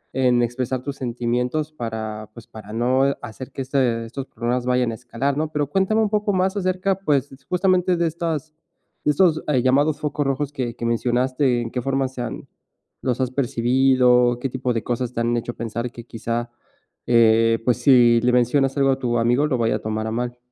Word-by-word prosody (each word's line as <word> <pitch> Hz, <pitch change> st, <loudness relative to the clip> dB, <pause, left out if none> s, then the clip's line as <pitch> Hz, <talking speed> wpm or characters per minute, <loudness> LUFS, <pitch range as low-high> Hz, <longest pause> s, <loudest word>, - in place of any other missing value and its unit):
en 125 Hz, -2 st, +3 dB
expresar 125 Hz, +1 st, -2 dB
tus 140 Hz, 0 st, -5 dB
sentimientos 125 Hz, +5 st, -2 dB
para, 110 Hz, -5 st, -5 dB
pues, 120 Hz, -, -11 dB
para 105 Hz, -1 st, -12 dB
no 125 Hz, +4 st, +1 dB, 0.2 s
hacer 125 Hz, +3 st, -8 dB
que 135 Hz, -, -4 dB
este, 125 Hz, -4 st, 0 dB
estos 135 Hz, +4 st, -7 dB
problemas 120 Hz, +2 st, -2 dB
vayan 125 Hz, -1 st, +1 dB
escalar, 125 Hz, +4 st, -3 dB
¿no?, 155 Hz, +1 st, 0 dB
pero 150 Hz, -1 st, 0 dB
cuéntame 195 Hz, +7 st, +1 dB
un 210 Hz, -, +1 dB
poco 210 Hz, 0 st, +1 dB
más 190 Hz, +2 st, +1 dB
acerca, 185 Hz, 0 st, 0 dB
pues, 145 Hz, -7 st, 0 dB, 0.2 s
justamente 180 Hz, -1 st, +2 dB
de 170 Hz, -, +1 dB
estas 160 Hz, -2 st, -3 dB, 0.5 s
de -, -, +1 dB
estos, 160 Hz, 0 st, +2 dB
eh, 130 Hz, -4 st, +2 dB
llamados 145 Hz, +4 st, +2 dB
focos 145 Hz, -1 st, -2 dB
rojos 135 Hz, +1 st, -1 dB
que 120 Hz, -4 st, -3 dB
que 120 Hz, -, -5 dB
mencionaste, 125 Hz, +2 st, +1 dB
¿en 115 Hz, -, -5 dB
qué 125 Hz, -, -2 dB
forma 135 Hz, +1 st, 0 dB
se 130 Hz, -1 st, -7 dB
han 120 Hz, -, -6 dB, 0.5 s
los 125 Hz, -1 st, -1 dB
has 130 Hz, -1 st, -1 dB
percibido, 125 Hz, -1 st, +3 dB
qué 135 Hz, -, -2 dB
tipo 125 Hz, 0 st, -2 dB
de 115 Hz, -, -2 dB
cosas 125 Hz, 0 st, -2 dB
te -, -, -3 dB
han 120 Hz, +1 st, +1 dB
hecho 120 Hz, +1 st, -3 dB
pensar 115 Hz, +1 st, -4 dB
que 120 Hz, -, -10 dB
quizá, 120 Hz, +1 st, -4 dB, 0.6 s
eh, 115 Hz, -1 st, +4 dB
pues, 125 Hz, -2 st, +2 dB
si 120 Hz, -2 st, +5 dB
le 125 Hz, -, +2 dB
mencionas 135 Hz, +3 st, +2 dB
algo 135 Hz, -1 st, +3 dB
a 130 Hz, -, -1 dB
tu 120 Hz, -2 st, 0 dB
amigo 120 Hz, +6 st, +2 dB
lo 130 Hz, -4 st, 0 dB
vaya 115 Hz, -1 st, +1 dB
a -, -, -10 dB
tomar 110 Hz, 0 st, -3 dB
a -, -, -3 dB
mal? 120 Hz, +1 st, -3 dB
125 Hz, 200 wpm, -22 LUFS, 120-140 Hz, 0.6 s, si